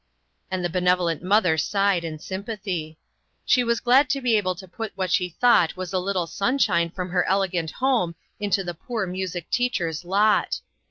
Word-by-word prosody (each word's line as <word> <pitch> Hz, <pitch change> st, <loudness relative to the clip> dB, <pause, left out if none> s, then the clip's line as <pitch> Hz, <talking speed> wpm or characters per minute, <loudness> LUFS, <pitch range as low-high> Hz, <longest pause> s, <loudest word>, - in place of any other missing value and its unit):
And 185 Hz, -1 st, -2 dB
the -, -, +3 dB
benevolent 180 Hz, -2 st, +1 dB
mother 180 Hz, -3 st, +3 dB
sighed 195 Hz, +1 st, +1 dB
in 160 Hz, -2 st, -5 dB
sympathy. 190 Hz, -4 st, -5 dB, 0.5 s
She 250 Hz, -, +4 dB
was 235 Hz, -1 st, +1 dB
glad 260 Hz, +3 st, +4 dB
to 275 Hz, -, +1 dB
be 245 Hz, -4 st, +2 dB
able 185 Hz, -3 st, +1 dB
to 190 Hz, +2 st, -11 dB
put 220 Hz, +4 st, -6 dB
what 185 Hz, -2 st, -1 dB
she 180 Hz, -1 st, +2 dB
thought 180 Hz, -2 st, +3 dB
was 185 Hz, +1 st, -5 dB
a 185 Hz, -, +2 dB
little 185 Hz, -1 st, -1 dB
sunshine 195 Hz, -4 st, +1 dB
from 180 Hz, +1 st, -5 dB
her 180 Hz, -, +2 dB
elegant 185 Hz, -4 st, 0 dB
home 240 Hz, -, 0 dB, 0.2 s
into 200 Hz, -2 st, 0 dB
the 175 Hz, -1 st, -4 dB
poor 220 Hz, +5 st, -4 dB
music 180 Hz, -2 st, -5 dB
teacher's 180 Hz, -10 st, 0 dB
lot. 205 Hz, +4 st, +2 dB
185 Hz, 175 wpm, -24 LUFS, 175-215 Hz, 0.5 s, She